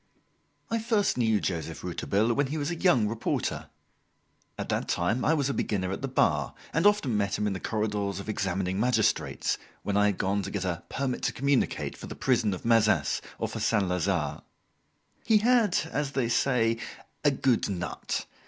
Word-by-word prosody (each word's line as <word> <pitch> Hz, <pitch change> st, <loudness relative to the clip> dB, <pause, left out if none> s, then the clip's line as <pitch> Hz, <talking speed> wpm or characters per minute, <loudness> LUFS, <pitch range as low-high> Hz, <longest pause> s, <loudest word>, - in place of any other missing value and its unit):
I 230 Hz, -, +1 dB
first 220 Hz, -2 st, +1 dB
knew 110 Hz, -3 st, +2 dB
Joseph 85 Hz, -5 st, -3 dB
Rouletabille 110 Hz, +4 st, 0 dB
when 140 Hz, +3 st, +1 dB
he 150 Hz, +4 st, -3 dB
was 145 Hz, +2 st, -2 dB
a -, -, -2 dB
young 135 Hz, -, +3 dB
reporter. 115 Hz, +1 st, -2 dB, 0.9 s
At -, -, -5 dB
that -, -, -1 dB
time 100 Hz, +9 st, 0 dB
I 160 Hz, -, +3 dB
was 140 Hz, -3 st, +1 dB
a 140 Hz, -, -1 dB
beginner 95 Hz, -6 st, -1 dB
at 95 Hz, -, -4 dB
the -, -, -2 dB
Bar -, -, +1 dB, 0.2 s
and 165 Hz, +5 st, +4 dB
often 205 Hz, -, +2 dB
met 100 Hz, -1 st, 0 dB
him 105 Hz, -, -1 dB
in 105 Hz, -, 0 dB
the 95 Hz, -, -4 dB
corridors 105 Hz, -2 st, -2 dB
of 100 Hz, -, -8 dB
examining 95 Hz, -2 st, -1 dB
magistrates, 110 Hz, -2 st, +1 dB, 0.2 s
when 100 Hz, -, -1 dB
I 105 Hz, 0 st, +4 dB
had 100 Hz, -, 0 dB
gone 100 Hz, +2 st, 0 dB
to 95 Hz, -, -5 dB
get 100 Hz, -2 st, -3 dB
a 85 Hz, -2 st, -2 dB
"permit 135 Hz, -2 st, -2 dB
to -, -, 0 dB
communicate" 140 Hz, -1 st, 0 dB
for -, -, -9 dB
the -, -, -7 dB
prison 115 Hz, -6 st, +1 dB
of 90 Hz, -, -11 dB
Mazas, 110 Hz, -, +3 dB, 0.2 s
or -, -, -1 dB
for -, -, -6 dB
Saint 100 Hz, -5 st, +1 dB
Lazare. 90 Hz, -2 st, -1 dB, 0.8 s
He 220 Hz, -2 st, +4 dB
had, 225 Hz, -3 st, +3 dB
as 145 Hz, -1 st, -2 dB
they 125 Hz, -4 st, 0 dB
say, 115 Hz, -3 st, +2 dB, 0.4 s
"a 145 Hz, -, +6 dB
good 130 Hz, -5 st, +1 dB
nut." 90 Hz, -3 st, -3 dB
110 Hz, 190 wpm, -28 LUFS, 100-140 Hz, 0.9 s, a